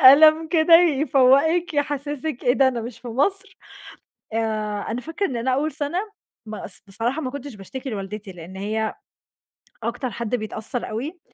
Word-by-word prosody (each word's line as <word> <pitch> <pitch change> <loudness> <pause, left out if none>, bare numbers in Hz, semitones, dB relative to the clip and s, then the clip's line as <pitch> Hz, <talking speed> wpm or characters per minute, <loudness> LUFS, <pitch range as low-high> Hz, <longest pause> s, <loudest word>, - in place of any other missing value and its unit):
قلم 310 +4 +8
كده 330 0 +5
يفوّقِك، 310 +1 +4
يحسّسِك 290 -1 -2
إيه 245 - +5
ده 270 0 +4
أنا 245 -2 -2
مش 230 0 -7
في 245 - -8
مصر؟ 385 - -1 0.8
آآ 225 - 0 0.5
أنا 235 - -2
فاكرة 325 +9 -2
إن 260 - -4
أنا 235 +3 0
أول 300 +4 0
سَنة 295 +4 -2 0.5
ما 215 0 -6
أص 180 - -10
بصراحة 230 +9 -2
ما 260 -4 -3
كنتش 280 -1 -7
باشتكي 255 +7 -7
لوالدتي 200 0 -6
لإن 175 +2 -10
هي 215 +2 -2 0.9
أكتر 240 +3 -2
حد 235 +1 -2
بيتأثّر 220 +2 -4
أوي، 290 +11 -5
260 Hz, 160 wpm, -23 LUFS, 225-310 Hz, 0.9 s, قلم